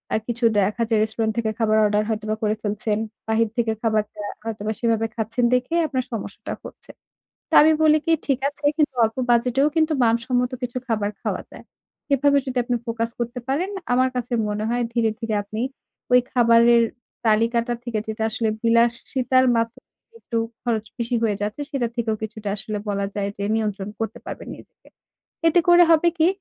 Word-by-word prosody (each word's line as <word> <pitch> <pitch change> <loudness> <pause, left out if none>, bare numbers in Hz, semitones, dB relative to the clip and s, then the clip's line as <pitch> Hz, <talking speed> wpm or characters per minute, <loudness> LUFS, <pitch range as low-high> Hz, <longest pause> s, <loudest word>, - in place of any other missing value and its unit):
আ - - +3
কিছু 240 0 -1
দেখা 210 +4 +1
যায় 220 -2 +3
রেস্টুরেন্ট 220 0 -1
থেকে 220 -2 0
খাবার 215 -1 +2
অর্ডার 210 0 +2
হয়তোবা 215 0 -1
করে 215 0 +2
ফেলছেন। 210 0 -1 0.3
বাহির 220 0 +2
থেকে 225 -2 +1
খাবারটা 215 -2 -1 0.2
হয়তোবা 220 -1 -3
সেভাবে 225 -1 +1
খাচ্ছেন 230 +2 0
দেখেই 255 +7 +1
আপনার 260 -3 -1
সমস্যাটা 225 - -5
হচ্ছে। - - -10 0.6
তো - - -1
আমি 315 +1 +6
বলি 310 0 +5
কি, 330 - +3
ঠিক 275 -3 +1
আছে 290 +1 -11
কিন্তু 295 -4 +1
অল্প 220 +2 -2
বাজেটেও 250 +4 +3
কিন্তু 315 0 +3
মানসম্মত 245 +2 +1
কিছু 250 0 -3
খাবার 210 -3 0
খাওয়া - - -2
যায়। - - -12 0.5
এভাবে 280 +1 +3
যদি 255 -1 -2
আপনি 245 0 0
ফোকাস 230 0 -2
করতে 240 +1 -3
পারেন, 340 +9 0 0.2
আমার 255 +1 +3
কাছে 245 0 -3 0.2
মনে 210 +1 -2
হয় 240 0 0
ধীরে, 225 -2 +2
ধীরে 225 -2 -2
আপনি 215 +2 -6 0.5
ওই 250 - +8
খাবারের 235 -1 +5 0.4
তালিকাটা 230 +2 +2
থেকে, 230 -3 -2
যেটা 220 0 -3
আসলে 220 0 -1
বিলাসিতার 240 +3 +2
মা 230 - +4 0.6
একটু 230 - -3 0.2
খরচ 225 -2 -1
বেশি 235 +1 -1
হয়ে 210 -3 +1
যাচ্ছে, 210 +7 -3
সেটা 265 -5 0
থেকেও 220 -2 0
কিছুটা 215 -1 -5
আসলে 215 +1 -4
বলা 200 -1 -1
যায় 200 -1 -1
যে 200 - -2
নিয়ন্ত্রণ 210 -3 -2
করতে 225 - -3
পারবেন - - -7
নিজেকে। - - -19 0.6
এতে 350 +2 +5
করে 350 0 +8
হবে 330 +2 +5
কি, 320 - +4
230 Hz, 175 wpm, -23 LUFS, 215-250 Hz, 0.6 s, ওই